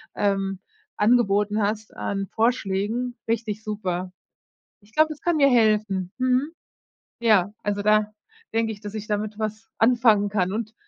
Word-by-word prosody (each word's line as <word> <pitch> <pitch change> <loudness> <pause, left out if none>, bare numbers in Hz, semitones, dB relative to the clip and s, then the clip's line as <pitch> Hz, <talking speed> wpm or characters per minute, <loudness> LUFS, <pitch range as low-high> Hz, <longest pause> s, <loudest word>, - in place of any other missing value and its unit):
ähm, 195 -1 0 0.4
angeboten 210 -2 +3
hast 215 +1 -2
an 195 -1 -3
Vorschlägen. 230 +1 0
Richtig 220 -2 -2
super. 185 -4 -3 0.7
Ich 210 +2 -25
glaube, 310 0 +4
das 305 - -7
kann 345 -1 +1
mir 280 -2 +5
helfen, 215 -6 +2
mhm. 255 +4 +1 0.7
Ja, 210 -4 +3
also 205 0 -1
da 215 0 +3 0.4
denke 225 0 0
ich, 205 - -11
dass 205 0 -6
ich 215 -1 -5
damit 210 0 -3
was 215 0 -4
anfangen 225 -3 +4
kann 190 -2 0
und 220 0 -4
215 Hz, 145 wpm, -24 LUFS, 205-230 Hz, 0.7 s, mir